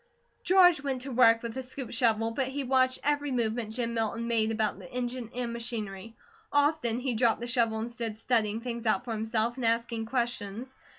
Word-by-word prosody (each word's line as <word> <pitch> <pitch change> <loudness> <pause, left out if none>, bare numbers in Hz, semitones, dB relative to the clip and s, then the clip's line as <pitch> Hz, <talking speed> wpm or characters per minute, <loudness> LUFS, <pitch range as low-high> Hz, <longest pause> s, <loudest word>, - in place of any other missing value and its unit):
George 355 -4 +6
went 270 -3 -2
to 270 - -6
work 230 -2 +5
with 230 -1 -4
the 265 - -4
scoop 260 0 -7
shovel, 225 -1 +2
but 260 +3 -1
he 275 +1 -3
watched 255 0 +2
every 290 0 +1
movement 230 -3 -1
Jim 235 -1 -2
Milton 230 +1 -1
made 225 -2 +1
about 215 -3 -1
the 180 - -12
engine 245 -1 -4
and 245 -1 -2
machinery. 225 -3 -5 0.4
Often 285 -5 +2
he 255 -1 -1
dropped 230 0 +2
the - - -3
shovel 235 -2 +1
and 225 +2 -4
stood 230 -2 -4
studying 225 -2 0
things 235 -1 -4
out 245 +3 +1
for 240 - -4
himself, 225 +2 -1
and 250 - -2
asking 230 -1 0
questions. 235 0 -3
235 Hz, 195 wpm, -29 LUFS, 225-255 Hz, 0.4 s, George